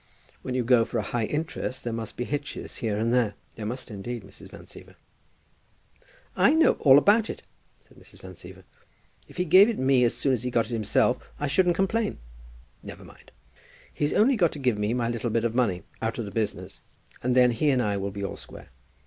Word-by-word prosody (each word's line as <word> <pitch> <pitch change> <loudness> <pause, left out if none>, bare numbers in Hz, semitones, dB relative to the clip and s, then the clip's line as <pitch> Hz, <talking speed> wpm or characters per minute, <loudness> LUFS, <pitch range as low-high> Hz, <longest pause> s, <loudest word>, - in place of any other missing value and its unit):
When 125 - -4
you 125 - 0
go 120 -1 +4
for 115 - -3
high 110 +3 -2
interest, 150 -2 -4
there 120 - -3
must 115 -1 -6
be 120 - -2
hitches 145 +3 -5
here 110 -3 -2
and 115 +2 0
there. 115 -5 +1 0.2
There 105 -2 -6
must, 125 +1 -6
indeed, 110 +3 -6
Mrs. 100 - -14
Van - - -12
Siever." - - -14 1.4
"I 270 +12 +4
know 320 0 +5
all 135 -2 +7
about 210 +8 +4
it," - - -7 0.4
said - - -22
Mrs. - - -17
Van - - -11
Siever. - - -13 0.6
"If - - -16
he 180 - 0
gave 185 +6 +7
it 230 - -2
me 130 -1 +3
as 120 - +1
soon 135 - +1
as 120 - -1
he 125 - -2
got 120 -2 +1
it - - -11
himself, 110 -3 +1 0.2
I 145 - -1
shouldn't 175 +4 +2
complain. 210 +4 0 0.6
Never - - -10
mind. - - -17 0.6
He's 145 0 -1
only 255 +5 +4
got 175 -7 +2
to - - -7
give 125 -6 0
me 105 +3 0
my 120 -2 -1
little 120 0 -2
bit 115 0 0
of 115 - -1
money 110 -8 0 0.2
out 115 0 -2
of 115 - -3
the 100 - -8
business, 110 -1 -4 0.4
and 125 0 0
then 125 -1 +5
he 145 +6 0
and 130 -3 +2
I 105 -4 0
will 100 0 -3
be 100 0 -7
all 100 - -4
square. - - -12
125 Hz, 215 wpm, -26 LUFS, 115-145 Hz, 1.4 s, all